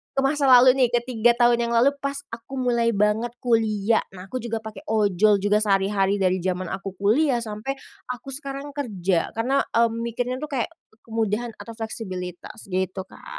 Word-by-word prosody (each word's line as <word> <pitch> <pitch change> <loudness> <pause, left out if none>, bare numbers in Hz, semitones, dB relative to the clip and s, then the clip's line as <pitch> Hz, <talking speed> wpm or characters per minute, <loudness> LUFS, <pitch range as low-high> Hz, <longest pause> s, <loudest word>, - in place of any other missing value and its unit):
ke 270 - +1
masa 280 0 +2
lalu 255 0 +8
nih, 250 - +5
ke 240 -1 +1
3 235 0 +3
tahun 240 -1 +3
yang 235 - -1
lalu 245 +4 +5
pas 280 0 -3 0.2
aku 230 +4 -8
mulai 240 -3 +1
banget 210 +3 +1
kuliah. 225 -2 +2 0.2
Nah, 185 +1 -10
aku 255 - -2
juga 225 -2 -4
pakai 220 0 -9
ojol 210 -1 +3
juga 205 +1 +3
sehari-hari 195 -1 +2
dari 185 0 +2
zaman 185 0 -2
aku 195 0 -5
kuliah 240 +6 +3
sampai 220 +5 -4 0.4
aku 250 +2 -8
sekarang 275 +1 -5
kerja. 195 - -1
Karena, 255 +5 +1
mmm, 230 0 +1
mikirnya 245 +2 -2
tuh, 305 - -5
kayak 265 +4 -1 0.3
kemudahan 225 +1 -1
atau 230 - -8
fleksibilitas, 190 -3 -6
gitu 185 +1 -1
Kak. - - -16
230 Hz, 175 wpm, -24 LUFS, 200-245 Hz, 0.4 s, lalu